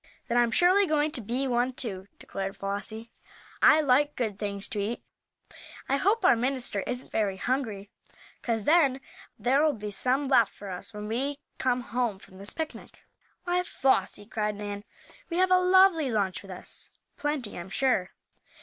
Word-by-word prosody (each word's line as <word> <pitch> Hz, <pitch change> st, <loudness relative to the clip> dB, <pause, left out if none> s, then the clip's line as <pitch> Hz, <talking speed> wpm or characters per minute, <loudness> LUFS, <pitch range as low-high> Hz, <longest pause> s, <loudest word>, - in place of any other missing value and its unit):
"Then 240 Hz, -, 0 dB
I'm 240 Hz, -1 st, +3 dB
surely 370 Hz, +9 st, +4 dB
going 305 Hz, -1 st, +1 dB
to 255 Hz, -, -2 dB
be 240 Hz, +6 st, -2 dB
one, 245 Hz, +1 st, +1 dB
too," 195 Hz, -7 st, -3 dB
declared 195 Hz, 0 st, -5 dB
Flossie. 210 Hz, +3 st, -4 dB, 0.5 s
"I 310 Hz, 0 st, +7 dB
like 290 Hz, +1 st, +3 dB
good 215 Hz, -5 st, -2 dB
things 200 Hz, -1 st, -2 dB
to 210 Hz, -, -3 dB
eat. 210 Hz, +4 st, -3 dB, 0.8 s
I 275 Hz, -, +2 dB
hope 400 Hz, +6 st, +2 dB
our 365 Hz, -, +7 dB
minister 245 Hz, -3 st, 0 dB
isn't 250 Hz, +1 st, -2 dB
very 200 Hz, -3 st, 0 dB
hungry, 215 Hz, -4 st, -2 dB, 0.5 s
'cause 225 Hz, -3 st, -1 dB
then 290 Hz, -5 st, +4 dB, 0.4 s
there'll 285 Hz, +5 st, +3 dB
be 210 Hz, -3 st, -6 dB
some 255 Hz, +7 st, +2 dB
left 255 Hz, -6 st, +3 dB
for 200 Hz, -1 st, -8 dB
us 180 Hz, +5 st, -7 dB
when 210 Hz, -1 st, -7 dB
we 270 Hz, +6 st, -1 dB, 0.2 s
come 250 Hz, -1 st, +1 dB
home 240 Hz, -3 st, -2 dB
from 190 Hz, 0 st, -16 dB
this 200 Hz, -, -3 dB
picnic." 320 Hz, -1 st, -7 dB, 0.4 s
"Why, 355 Hz, 0 st, +1 dB
Flossie!" 265 Hz, -10 st, 0 dB
cried 210 Hz, -1 st, -2 dB
Nan. 205 Hz, 0 st, -6 dB, 0.4 s
"We 340 Hz, -, -2 dB
have 370 Hz, 0 st, +3 dB
a 365 Hz, -, +6 dB
lovely 365 Hz, -5 st, +5 dB
lunch 200 Hz, -5 st, -1 dB
with 195 Hz, -, -14 dB
us; 180 Hz, -1 st, -6 dB, 0.3 s
plenty, 295 Hz, -7 st, -2 dB
I'm 175 Hz, +2 st, -8 dB
sure." 205 Hz, -5 st, +1 dB
245 Hz, 170 wpm, -28 LUFS, 205-290 Hz, 0.8 s, I